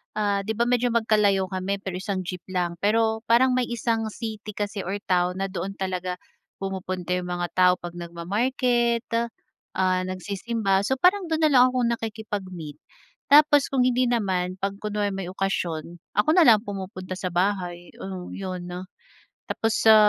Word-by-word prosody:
ah, 205 -2 +1
di 220 +1 -2
ba 235 - +2
medyo 245 0 +2
magkalayo 210 -4 +3
kami 190 +1 -1
pero 185 -1 -4
isang 190 -1 -3
jeep 180 0 -5
lang 175 -2 -2
pero 220 +2 +2
parang 245 +3 +5
may 250 -1 +1
isang 230 -2 -1
city 215 -2 -6
kasi 205 0 -3
or 190 +2 -2
town 180 0 +1
na 195 - -1
doon 190 +1 -4
talaga 185 -1 -3 0.4
pumupunta 185 -2 -4
yung 180 0 -2
mga 175 0 -1
tao 180 0 +5
'pag 175 -1 -8
nagma-market, 235 +8 0 0.7
ah, 185 -1 +2
nagsisimba. 195 +2 -1
So 265 - +2
parang 365 +6 +3
do'n 320 -1 0
nalang 260 -5 +6
akong 245 -2 +2
nakikipag-meet, 200 -9 -5 0.5
tapos 290 -1 +6
kung 265 -2 +2
hindi 250 0 +2
naman, 190 -6 0
'pag 195 0 -2
kunwari 210 -1 -1
may 195 -2 -4
okasyon, 175 -3 -3 0.2
ako 210 - +3
nalang 245 - +6
pumupunta 190 -3 -7
sa 185 - -2
bahay. 175 -2 -1
Oh, 185 -2 -6
yun. 185 -2 -5 0.8
Tapos 225 0 0
sa 220 -1 +8
200 Hz, 155 wpm, -25 LUFS, 185-230 Hz, 0.8 s, sa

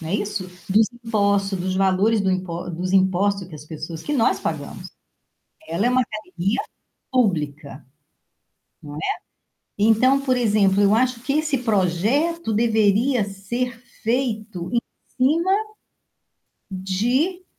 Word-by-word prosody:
Não 160 - -6
é 190 - -1
isso? 205 -1 -2 0.2
Dos 215 +3 +4
impostos, 200 -4 0
dos 185 +1 -2
valores 195 +3 +3
do 190 - +1
impo 180 -1 -3
dos 180 +2 -3
impostos 190 0 +2
que 165 - -12
as 150 0 -10
pessoas 155 +1 -7
que 295 - -3
nós 240 -6 +2
pagamos, - - -5 0.8
ela 190 +7 0
é 245 - +3
uma 255 0 +3
academia 215 -1 -3 0.5
pública, 155 - -1 1.0
não 145 -1 -9
é? - - -5 0.8
Então, 225 +6 +4
por 255 -2 +1
exemplo, 205 -4 +3
eu 205 +2 +5
acho 250 -1 +1
que 265 +2 -1
esse 300 -3 +1
projeto 225 - +1
deveria 220 +2 +3
ser 230 +5 -4 0.3
feito 220 -6 -1
em 235 - +4 0.4
cima 325 +8 +2 1.2
de 240 - 0
210 Hz, 130 wpm, -22 LUFS, 185-245 Hz, 1.2 s, eu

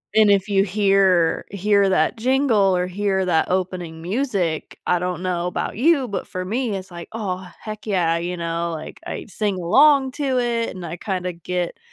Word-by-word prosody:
And 215 -1 +6
if 195 -1 +3
you 195 -1 +3
hear 195 -4 +2
hear 200 0 +2
that 190 - +2
jingle 230 -6 +3
or 180 - 0
hear 190 0 -1
that 165 -2 +1
opening 180 -3 -2
music, 195 - -2
I 180 - +2
don't 180 0 -3
know 180 -1 -1
about 180 - -3
you, 275 +1 +3
but 200 - -4
for 185 0 -5
me, 230 +1 -1
it's 190 -1 -7
like, 170 -1 -8
"Oh, 190 -4 -4
heck 215 0 -8
yeah." 170 -4 +1
You 175 +1 -3
know? 170 0 -2
Like, 155 0 -8
I - - -5
sing 205 -1 -2
along 265 - +4
to 270 -4 -1
it, 235 -1 0
and 180 -2 -7
I 170 +1 -6
kinda 180 -1 -3
get 175 - -4
190 Hz, 185 wpm, -22 LUFS, 180-215 Hz, -, And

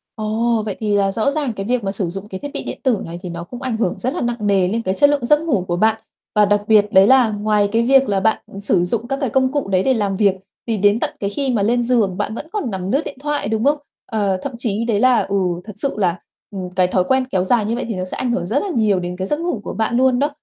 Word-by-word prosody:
Ồ, 220 +1 0
vậy 205 -3 -3
thì 210 -2 0
là 195 -1 +2
rõ 225 +7 0
ràng 285 -5 -2
cái 195 -2 -5
việc 245 +1 0
mà 195 - -1
sử 195 -1 -1
dụng 195 +3 -6
cái 190 -2 -7
thiết 285 - -6
bị - - -4
điện - - -6
tử 255 -5 +2
này 170 +1 -7
thì 180 - -5
nó 170 0 -6
cũng 245 +8 -10
ảnh 255 -4 -2
hưởng 205 -6 -1
rất 255 +3 -2
là - - -3
nặng 240 0 -1
nề 195 -3 +3
lên 225 +5 -1
cái 190 -4 -1
chất 285 +8 +4
lượng 285 -4 0
giấc 295 +4 +4
ngủ 240 - 0
của 175 - 0
bạn. 220 +4 +2 0.3
Và 210 0 +5
đặc 205 0 +2
biệt 215 -2 +5
đấy 190 +1 +7
là 260 -2 +5
ngoài 210 -1 +1
cái 230 +1 +2
việc 270 0 +4
là 200 -1 +1
bạn, 220 +3 +1
ừ, 195 - -7
sử 195 -3 +2
dụng 225 +6 -2
các 270 +1 -2
cái 270 - 0
công 260 +2 +2
cụ 285 -5 -1
đấy 185 -1 +2
để 265 - +3
làm 205 -5 -1
việc 200 -2 +3 0.3
thì 225 -2 0
đến 205 +2 +3
tận - - -1
cái 200 - -1
khi 270 +6 -2
mà 225 -5 +1
lên 240 +3 +2
giường 225 -7 +1
bạn 210 +2 -2
vẫn 295 - -7
còn 405 - -3
nằm 190 0 -3
lướt 280 - +2
điện 280 - -7
thoại, 295 -4 -2
đúng 220 +1 -1
không? 290 +3 +3 0.3
Ờ, 200 -4 0
thậm 280 - -4
chí 230 -2 -2
đấy 220 -3 +1
là 255 0 +4
ừ, 200 - -3 0.3
thật 210 - -8
sự 275 +7 -2
là, 180 -4 0 0.3
ừm, 185 -3 -5
cái 185 -1 +3
thói 185 0 +1
quen 260 +5 +1
kéo 185 -2 +1
dài 215 +2 +2
như 225 +3 -1
vậy 245 - -3
thì 225 - -3
nó 185 - -3
sẽ 185 - -6
ảnh 250 -2 -1
hưởng 175 -7 -1
rất 235 +10 0
là 405 - -3
nhiều 210 -5 +2
đến 180 0 -4
cái 190 +1 -3
giấc 295 - -1
ngủ 335 -10 -2
của - - -5
bạn 225 +2 0
luôn 255 -1 +3
đó. 290 +2 +2
220 Hz, 310 wpm, -19 LUFS, 195-250 Hz, 0.3 s, đấy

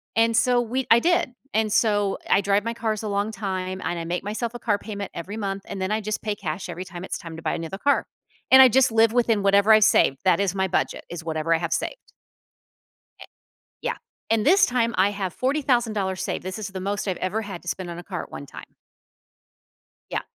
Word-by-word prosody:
and 230 0 +3
so 245 +2 +3
we 250 +3 -2
I 230 - +8
did, 335 -5 +1 0.2
and 215 -1 +1
so 205 -3 +2
I 200 - +4
drive 200 +1 +1
my 230 - -1
cars 220 -2 -2
a - - -3
long 205 +2 -1
time, 185 -3 -4
and 175 - -2
I - - -4
make 175 +3 -3
myself 225 +3 -3
a 240 - -7
car 205 -3 +1
payment 205 -2 -6
every 195 +6 -6
month, 195 -2 -3
and 195 - -6
then 190 +2 -1
I 215 +1 0
just 215 +1 -3
pay 210 -1 -2
cash 180 -2 -5
every 180 - -5
time 175 +1 -8
it's - - -4
time 165 -1 -9
to - - -8
buy - - -1
another 165 +3 -5
car, 285 +6 +2 0.5
and 265 - +10
I 260 - +10
just 255 0 +3
live 225 0 +4
within 230 -4 +2
whatever 200 +2 +4
I 215 - +8
save, 200 -9 +4
that 185 - +4
is 195 -2 0
my 190 0 +1
budget, 180 - -1
is 170 -2 -7
whatever 160 0 0
I - - +3
have 170 -1 -3
saved. - - -4 1.1
Eh - - -10 0.6
Yeah, 480 0 -2 0.3
and 225 -1 +2
this 390 +5 +6
time 235 -2 0
I 190 +2 +4
have 195 -4 -4
$40,000 235 -9 0
saved, - - -3
this 190 +3 -5
is 210 - -4
the 190 -1 -6
most 200 +1 -2
I've 185 - -1
ever 200 +4 -2
had 195 -5 -7
to - - -14
spend 180 0 -4
on 170 - -6
a - - -9
car 180 -1 -5
at - - -14
one 140 - -7
time. - - -12 1.4
Yeah. - - -1
205 Hz, 235 wpm, -24 LUFS, 185-225 Hz, 1.4 s, and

